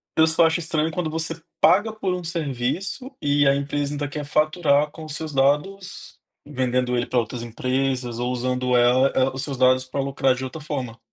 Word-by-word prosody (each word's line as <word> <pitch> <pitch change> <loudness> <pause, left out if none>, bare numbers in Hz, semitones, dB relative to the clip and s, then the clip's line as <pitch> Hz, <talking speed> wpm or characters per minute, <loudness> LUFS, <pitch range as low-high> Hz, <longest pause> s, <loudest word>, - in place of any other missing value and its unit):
eu 160 0 +5
só 160 +1 +5
acho 165 +1 +2
estranho 160 -1 -1
quando 165 0 -2
você 160 +1 -3 0.2
paga 205 +4 +4
por 200 -4 -2
um 180 -1 -4
serviço 170 - -3
e 145 0 +3
a 135 - +4
empresa 145 +1 -2
ainda 145 0 -3
quer 150 +1 -5
faturar 150 0 +2
com 160 - -10
os 155 -1 -5
seus 155 0 -5
dados, 150 +8 -1 0.3
vendendo 125 -3 -1
ele 120 0 -1
pra 125 - -1
outras 120 +1 -4
empresas 125 +1 -2
ou 125 +1 -1
usando 125 0 0
ela 125 +2 +4
é, 130 0 +3
os 135 - -4
seus 140 -3 -4
dados 130 0 +4
pra 130 +2 -5
lucrar 135 -1 +1
de 130 - -6
outra 130 +4 -6
forma 130 -6 -5
140 Hz, 200 wpm, -23 LUFS, 130-160 Hz, 0.3 s, eu